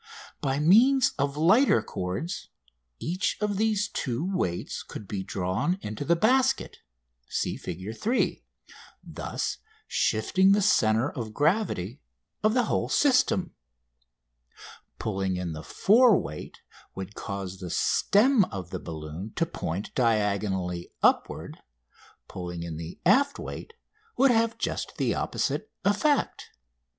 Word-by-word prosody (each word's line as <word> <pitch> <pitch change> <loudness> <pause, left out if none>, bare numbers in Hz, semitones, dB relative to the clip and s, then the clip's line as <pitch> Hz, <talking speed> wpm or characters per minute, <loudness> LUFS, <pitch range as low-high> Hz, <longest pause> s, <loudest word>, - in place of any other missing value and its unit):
By 135 -1 0
means 230 - +5
of 140 +1 0
lighter 180 - +4
cords 95 - -4 0.5
each 185 - -1
of 210 -2 -1
these 215 -1 +1
two 135 - -3
weights 90 - -2
could 105 - -9
be 100 -1 -3
drawn 95 - -1
into 110 +6 -4
the 170 +4 +3
basket 260 +8 +2 0.5
(see - - -1
Fig. 95 +5 -6
3), 235 - 0 0.6
thus - - -4 0.3
shifting 190 +1 +3
the 205 - +3
centre 110 -2 +3
of 110 -6 -6
gravity 145 - 0 0.4
of 215 +2 +3
the 250 - +4
whole - - -1
system. 230 -8 +2 1.4
Pulling 95 -3 -2
in 90 -3 -3
the 80 - -6
fore 215 - +5
weight 75 +2 -8 0.3
would 95 +1 -6
cause 95 -3 -6
the 90 -2 -6
stem 215 - +3
of 95 - -7
the - - -4
balloon 80 +5 -7
to 165 - +1
point 100 - -5
diagonally 100 -6 0
upward; - - +1 0.7
pulling 90 -2 -6
in 85 -2 -5
the 85 +1 -8
aft 280 +10 +4
weight 460 - -7 0.4
would 270 -1 +5
have 230 0 +2
just - - -3
the - - +1
opposite - - -2
effect. 280 +8 +1
135 Hz, 125 wpm, -27 LUFS, -, 1.4 s, means